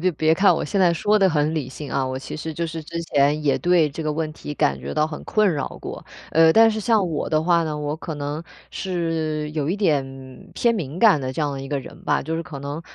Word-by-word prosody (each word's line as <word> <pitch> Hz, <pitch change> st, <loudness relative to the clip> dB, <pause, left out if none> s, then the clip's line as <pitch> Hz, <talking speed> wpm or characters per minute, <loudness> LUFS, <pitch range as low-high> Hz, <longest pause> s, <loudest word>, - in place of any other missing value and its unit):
别 185 Hz, +1 st, +1 dB
别 155 Hz, +1 st, +2 dB
看 195 Hz, +5 st, +5 dB
我 -, -, -2 dB
现 200 Hz, -, -1 dB
在 175 Hz, -2 st, +4 dB
说 210 Hz, +6 st, +2 dB
得 195 Hz, -2 st, +4 dB
很 150 Hz, -2 st, +1 dB
理 150 Hz, -5 st, -2 dB
性 140 Hz, +2 st, -8 dB
啊， 135 Hz, -1 st, 0 dB
我 130 Hz, 0 st, -3 dB
其 130 Hz, -, -6 dB
实 160 Hz, +1 st, -5 dB
就 170 Hz, +2 st, -2 dB
是 160 Hz, 0 st, -5 dB
之 170 Hz, +2 st, -5 dB
前， 145 Hz, -1 st, +2 dB
也 145 Hz, -2 st, +2 dB
对 175 Hz, -4 st, +3 dB
这 140 Hz, -, -7 dB
个 155 Hz, -1 st, -1 dB
问 155 Hz, 0 st, -3 dB
题 150 Hz, -1 st, -7 dB
感 70 Hz, -, +1 dB
觉 70 Hz, +2 st, -6 dB
到 150 Hz, -, +3 dB
很 155 Hz, -1 st, -6 dB
困 215 Hz, -4 st, +2 dB
扰 145 Hz, -, -2 dB, 0.2 s
过。 -, -, -7 dB, 0.3 s
呃， 160 Hz, 0 st, +5 dB
但 225 Hz, +3 st, +6 dB
是 220 Hz, -, -3 dB
像 220 Hz, -1 st, +2 dB
我 155 Hz, -, -2 dB
的 155 Hz, 0 st, +1 dB
话 170 Hz, 0 st, +3 dB
呢， 155 Hz, -1 st, -3 dB
我 150 Hz, +1 st, -3 dB
可 160 Hz, 0 st, -6 dB
能 145 Hz, +1 st, -4 dB, 0.3 s
是 165 Hz, -4 st, -2 dB
有 150 Hz, -2 st, -2 dB
一 180 Hz, -, 0 dB
点 135 Hz, -8 st, -2 dB
偏 235 Hz, -1 st, +2 dB
敏 170 Hz, -5 st, -4 dB
感 205 Hz, -10 st, +6 dB
的 130 Hz, -1 st, -3 dB
这 155 Hz, -, -2 dB
样 145 Hz, -, 0 dB
的 135 Hz, -, -5 dB
一 135 Hz, -, -6 dB
个 145 Hz, -1 st, -1 dB
人 -, -, -12 dB
吧， -, -, +1 dB
就 160 Hz, +3 st, -3 dB
是 165 Hz, -, -4 dB
可 140 Hz, -3 st, -8 dB
能 145 Hz, +2 st, -5 dB
155 Hz, 285 characters per minute, -22 LUFS, 145-170 Hz, 0.3 s, 但